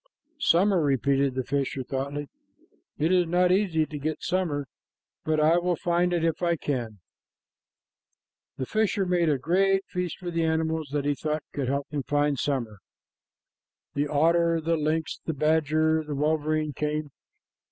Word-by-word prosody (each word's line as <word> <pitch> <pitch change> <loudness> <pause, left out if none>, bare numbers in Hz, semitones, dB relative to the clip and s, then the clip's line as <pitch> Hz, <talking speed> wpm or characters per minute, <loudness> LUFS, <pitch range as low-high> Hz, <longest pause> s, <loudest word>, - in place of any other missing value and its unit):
"Summer," 190 - +3
repeated 140 -1 +1
the 130 - -1
fisher 135 0 -2
thoughtfully. 140 +3 -4 0.7
"It 160 +4 +1
is 180 -2 +3
not 180 +1 +3
easy 180 -5 +2
to 150 -1 -7
get 155 +2 -3
summer, 165 -6 -1 0.6
but 155 0 +1
I 160 +3 +4
will 175 0 0
find 175 +1 +1
it 170 -2 +1
if 165 +1 -1
I 170 -1 +2
can." 145 -3 -2
PART 120 -3 -3
II. - - -21 1.6
The 130 - -2
fisher 210 - 0
made 175 -2 +2
a 145 - +2
great 195 +7 +2
feast 180 -3 -4
for 175 -1 -6
the 165 -1 0
animals 160 -1 0
that 145 -1 -1
he 145 - +2
thought 150 +1 -3
could 140 -3 -2
help 140 +2 -1
him 145 -2 -1
to - - -16
find 145 -2 +1
summer. 120 -8 -2 1.1
The 145 +1 0
otter, 165 +3 +3
the 165 +1 0
lynx, 155 +1 -1
the 160 - -1
badger, 155 +1 +2
and 155 -1 -7
the 145 - -2
wolverine 155 +1 0
came. 150 +1 -2
155 Hz, 170 wpm, -26 LUFS, 145-170 Hz, 1.6 s, I